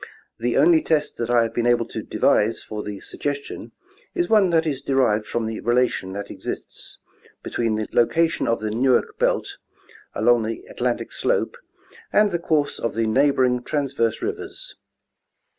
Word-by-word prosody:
The 120 +1 0
only 160 +2 +5
test 150 -2 0
that 115 0 -3
I 120 -1 +4
have 115 0 -3
been 120 0 0
able 120 -1 +3
to - - -4
devise 110 +2 +1
for 105 -1 -5
the 105 -2 -7
suggestion 145 -1 -5 0.4
is 350 -1 0
one 210 -4 +5
that 165 -1 +2
is 140 -4 -2
derived 120 -7 +1
from 120 -1 -2
the 110 0 -4
relation 120 -6 0
that 100 0 -6
exists - - -7 0.5
between 115 -2 -1
the 110 0 -2
loca 165 +8 +3
tion 170 0 -3
of 115 - 0
the 110 -1 -2
Newark 125 +2 +1
belt - - 0 0.6
along 120 -1 +4
the 110 +1 -4
Atlantic 120 -1 -2
slope - - 0 0.6
and 210 -1 +4
the 175 - -1
course 150 -4 0
of 115 -3 -2
the 115 0 +1
neighboring 130 +1 +2
transverse 130 -5 -1
rivers. - - -6
120 Hz, 165 wpm, -23 LUFS, 115-145 Hz, 0.6 s, only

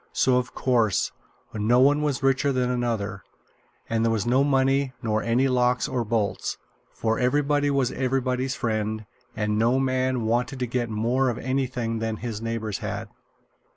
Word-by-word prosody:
So, 130 -1 +3
of 125 0 -3
course, 115 -6 +1 0.4
no 110 +3 +2
one 145 +3 +4
was 145 -3 -1
richer 135 +1 +2
than 125 -1 0
another, 110 -5 -2 0.7
and 115 -1 0
there 115 - +2
was 110 -3 0
no 130 +3 +3
money, 135 -1 +2
nor 110 -1 0
any 120 +4 +2
locks 125 -1 +2
or 125 -2 -1
bolts; 105 -4 -1 0.3
for 110 0 -1
everybody 145 +3 +2
was 135 -3 +1
everybody's 130 0 -1
friend, 110 -1 -2 0.3
and 105 -1 0
no 120 +3 +3
man 130 -2 0
wanted 120 +4 0
to 125 - -1
get 120 -1 -2
more 120 +5 +1
of 120 - -3
anything 125 -3 -2
than 110 0 -2
his 115 -2 -5
neighbors 115 -3 -3
had. - - -5
125 Hz, 160 wpm, -25 LUFS, 115-130 Hz, 0.7 s, one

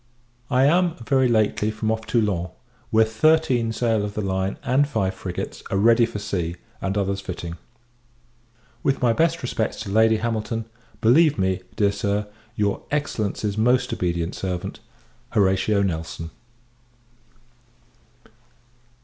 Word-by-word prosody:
I 130 +1 +3
am, 175 +3 +3
very 130 -1 +3
lately, 110 -2 +2
from 110 0 -1
off 110 0 -3
Toulon; 100 -7 0 0.4
where 110 0 +4
thirteen 120 0 +2
sail 115 -2 +1
of 105 0 -5
the 105 - -1
line, 95 0 -1
and 140 +3 +2
five 100 -9 -1
frigates, 90 -1 -5
are 95 - 0
ready 115 +3 +5
for 115 - -6
sea, 90 -5 -3 0.3
and 95 +1 -1
others 100 0 -1
fitting. 85 -3 -6 1.3
With 135 - +1
my 120 -2 +3
best 165 +3 +1
respects 115 -3 -2
to 105 - -5
Lady 110 +1 +4
Hamilton, 115 0 -2 0.4
believe 150 +7 +5
me, 95 -1 0
dear 100 -1 +3
Sir, 100 +1 -1 0.3
your 105 -2 0
Excellency's 110 -7 -2
most 125 +3 +2
obedient 85 -1 -1
servant, 90 -2 -4 0.5
HORATIO 100 +1 +2
NELSON. 80 -2 -3
110 Hz, 130 wpm, -23 LUFS, 95-120 Hz, 1.3 s, ready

